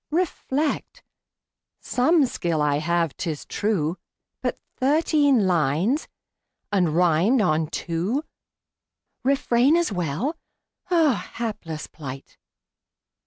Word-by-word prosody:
Reflect. 310 -3 -1 0.8
Some 290 +4 +3
skill 170 -9 -2
I 145 -1 +2
have, 165 -1 0
'tis 160 -5 -4
true; 185 -6 -1 0.4
But - - -2 0.2
thirteen 285 - +3
lines! 175 - +1 0.6
and 180 -6 +2
rimed 180 +8 +3
on 160 -6 +2
two! 175 - -2 1.0
"Refrain" 270 +1 +3
as 345 -8 +1
well. 180 - -2 0.5
Ah, 320 - +2
Hapless 205 -9 -4
plight! 135 -3 -9
200 Hz, 90 wpm, -24 LUFS, -, 1.0 s, Some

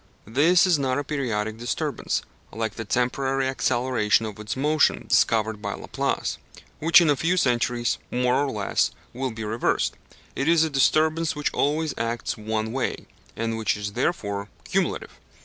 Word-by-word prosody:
This 155 - +4
is 175 -5 +3
not 130 -1 0
a 145 - -1
periodic 115 -7 -2
disturbance, 120 - -2 0.3
like 110 -1 -3
the 115 - -6
temporary 130 +4 0
acceleration 120 -4 +1
of 105 -1 -7
its 105 +3 -4
motion 150 +3 +2
discovered 110 -1 +2
by 100 -2 -3
Laplace, - - -2 0.4
which 165 +3 +6
in 165 - +3
a - - +3
few 170 +6 +1
centuries, 120 -4 +1
more 125 0 +1
or 145 - -1
less, 105 -5 0 0.2
will 130 +1 -2
be 110 -1 -6
reversed; 110 +2 0 0.4
it 135 - -1
is 165 -1 +5
a 160 - -1
disturbance 155 +4 +2
which 150 0 -2
always 155 +2 0
acts 115 +1 -2
one 110 0 -3
way, 130 +2 -2 0.3
and 115 0 -2
which 110 -2 0
is 105 0 -5
therefore 100 -7 -2
cumulative. - - -2
125 Hz, 160 wpm, -25 LUFS, 110-145 Hz, 0.4 s, which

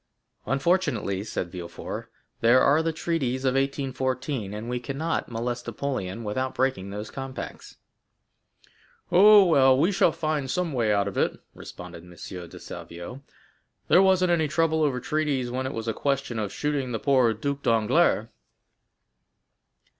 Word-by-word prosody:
"Unfortunately," 135 - 0
said 90 -4 -4
Villefort, 85 -2 -7 0.3
"there 120 +3 +5
are 145 +4 +4
the 165 0 0
treaties 140 -6 -2
of 130 - +3
1814, 135 -4 -2
and 105 +2 -6
we 125 0 -2
cannot 140 +6 -3
molest 120 +1 -4
Napoleon 115 -7 -4
without 130 +5 -2
breaking 130 -8 0
those 105 +2 -6
compacts." 135 -1 -7 1.3
"Oh, 200 +2 +8
well, 135 -6 +5
we 165 +8 +3
shall 185 -3 +3
find 155 -4 -2
some 175 +1 -1
way 115 -4 +1
out 100 -1 +2
of 100 - -3
it," - - 0
responded 90 -2 -10
M. 90 - -15
de 90 0 -9
Salvieux. 85 +10 -9 0.7
"There 180 - +7
wasn't 185 -2 +4
any 160 -3 +2
trouble 160 +1 +1
over 140 -4 +1
treaties 140 -3 -1
when 130 +1 -2
it - - -4
was 115 0 -5
a 115 - 0
question 135 -4 -1
of 105 -2 -3
shooting 140 -4 -2
the - - 0
poor 130 -5 +3
Duc 140 +5 -3
d'Enghien." 115 -4 +2
130 Hz, 145 wpm, -26 LUFS, 115-150 Hz, 1.3 s, Oh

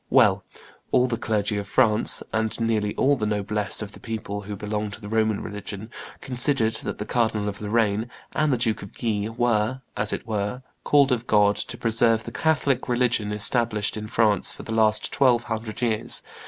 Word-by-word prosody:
Well, 105 -7 +4 0.5
all 125 - +4
the 125 -2 -1
clergy 105 -3 -1
of 100 - -6
France, 110 0 +2
and 110 0 +1
nearly 110 -2 0
all 140 +2 +3
the 110 -5 -2
noblesse 105 0 -2
and 100 - -8
the - - -13
people 110 -3 -5
who 105 0 -6
belonged 105 0 -4
to - - -8
the 105 - -8
Roman 110 -1 +1
religion, 105 +1 -7 0.3
considered 125 -3 +4
that - - -5
the - - -5
Cardinal 110 -3 0
of 105 0 -5
Lorraine 110 +1 0 0.2
and 155 -2 +1
the 125 - +2
Duke 115 -2 0
of 100 - -11
Guise 110 -2 -1
were, 120 +1 +1
as 105 0 0
it - - -4
were, 110 +3 -3 0.2
called 140 -2 +4
of 120 -1 -1
God 105 -1 +4
to - - -4
preserve 115 -1 +2
the - - -7
Catholic 140 -5 0
religion 120 -4 +1
established 105 0 +1
in 105 0 -5
France 105 -2 +2
for - - -9
the 110 - -5
last 110 -1 +2
twelve 125 -4 +3
hundred 115 0 -5
years. 110 -3 -1
110 Hz, 190 wpm, -24 LUFS, 105-120 Hz, 0.5 s, Well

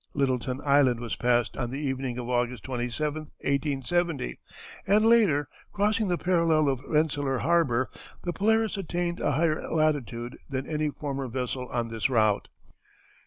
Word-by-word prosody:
Littleton 130 -1 0
Island 140 -4 +4
was 115 -2 -4
passed 120 -1 +1
on 120 -2 -2
the 130 - -4
evening 130 -3 -2
of 120 -1 -4
August 125 0 -1
27, 130 +5 -2 0.2
1870, 140 - -1 0.5
and 210 +3 +4
later, 205 - +4 0.2
crossing 210 +1 +1
the 175 -1 +1
parallel 165 -4 +2
of 135 -2 0
Rensselaer 145 -3 +1
Harbor, 135 -6 +2 0.4
the 175 - -2
Polaris 220 +2 +2
attained 175 -1 -2
a - - +1
higher 155 +2 0
latitude 140 -6 0
than 135 -1 -3
any 155 -1 -1
former 140 -2 -4
vessel 125 +1 -3
on 120 -2 -2
this 115 +3 -1
route. 110 -5 +2
140 Hz, 145 wpm, -27 LUFS, 125-165 Hz, 0.5 s, Island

